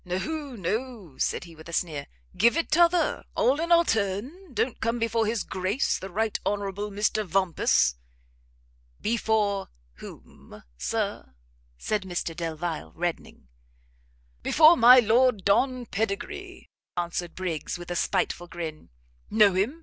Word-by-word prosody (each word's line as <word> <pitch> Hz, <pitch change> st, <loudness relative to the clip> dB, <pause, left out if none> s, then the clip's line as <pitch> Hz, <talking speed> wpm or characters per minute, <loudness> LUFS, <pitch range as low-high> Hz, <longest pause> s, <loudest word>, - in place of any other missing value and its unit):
"No, 275 Hz, -, -4 dB
no," 215 Hz, -, -4 dB
said -, -, 0 dB
he, 170 Hz, -2 st, -13 dB
with 160 Hz, +1 st, -13 dB
a -, -, -9 dB
sneer, 155 Hz, -5 st, -2 dB, 0.3 s
"give 235 Hz, -, +4 dB
it 335 Hz, -, -1 dB
t'other; 345 Hz, +2 st, +3 dB
all 265 Hz, +5 st, +2 dB
in 335 Hz, +1 st, -2 dB
our 340 Hz, 0 st, +6 dB
turn; 225 Hz, -, -2 dB
don't 250 Hz, -1 st, -2 dB
come 230 Hz, +1 st, 0 dB
before 230 Hz, -1 st, 0 dB
his 225 Hz, -1 st, -1 dB
Grace 190 Hz, +7 st, -1 dB
the 190 Hz, -, -7 dB
Right 215 Hz, +3 st, -1 dB
Honourable 205 Hz, 0 st, -2 dB
Mr 210 Hz, +1 st, 0 dB
Vampus." 175 Hz, -, +2 dB, 1.0 s
"Before 210 Hz, -3 st, 0 dB, 0.3 s
whom, -, -, -13 dB
Sir?" 65 Hz, +1 st, -3 dB, 0.4 s
said 210 Hz, -, -1 dB
Mr 175 Hz, -3 st, -4 dB
Delvile, 160 Hz, -, -4 dB
reddening. -, -, -4 dB, 0.9 s
"Before 320 Hz, +2 st, +6 dB
my 250 Hz, -2 st, +8 dB
Lord 235 Hz, -2 st, +3 dB
Don 250 Hz, +5 st, +2 dB
Pedigree," 225 Hz, -, -4 dB, 0.3 s
answered 175 Hz, 0 st, -3 dB
Briggs, 180 Hz, -3 st, -3 dB
with 175 Hz, 0 st, -9 dB
a -, -, -2 dB
spiteful 175 Hz, 0 st, -1 dB
grin, 165 Hz, -3 st, -7 dB, 0.4 s
"know 210 Hz, -3 st, +5 dB
him? 215 Hz, -, 0 dB
205 Hz, 135 wpm, -26 LUFS, 175-245 Hz, 1.0 s, my